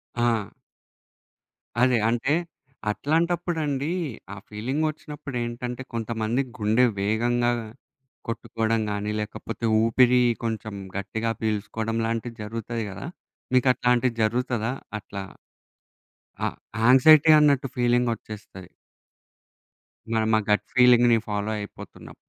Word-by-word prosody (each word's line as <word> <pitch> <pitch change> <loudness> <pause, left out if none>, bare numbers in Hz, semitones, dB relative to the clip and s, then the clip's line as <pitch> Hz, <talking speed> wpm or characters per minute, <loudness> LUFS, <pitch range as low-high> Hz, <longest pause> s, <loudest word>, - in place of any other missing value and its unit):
ఆ! 115 -4 +1 1.3
అదే. 125 -1 +4
అంటే, 120 +5 +1 0.6
అట్లాంటప్పుడండి 160 0 0 0.4
ఆ - - -7
ఫీలింగొచ్చినప్పుడేంటంటే 130 -1 -4
కొంతమంది 115 +2 -1 0.2
గుండె 110 +4 +3
వేగంగా 120 +4 +1 0.8
కొట్టుకోడం 115 -1 -1
గానీ, 105 +1 -2
లేకపోతే 115 +2 -5 0.2
ఊపిరి 125 +2 +4 0.2
కొంచెం 110 -2 -3 0.2
గట్టిగా 110 +3 -2
పీల్సుకోడం 110 +1 -2
లాంటివి 115 +1 -3
జరుగుతాయి 115 +1 -4
గదా! 100 - -7 0.5
మీకట్లాంటివి 125 -1 +3
జరుగుతదా 120 0 0 0.3
అట్లా? 100 -1 -7 1.2
ఆ - - +2 0.4
యాంగ్జైటీ 145 +6 +7
అన్నట్టు 140 -3 +3
ఫీలింగొచ్చేస్తది. 115 -6 -1 1.4
మన‌మా 110 0 +2
గట్ 105 - +2
ఫీలింగ్‌ని 120 -2 +6
ఫాలో 105 +1 -2
అయిపోతున్నాం. 100 - -10
120 Hz, 85 wpm, -25 LUFS, 110-125 Hz, 1.4 s, యాంగ్జైటీ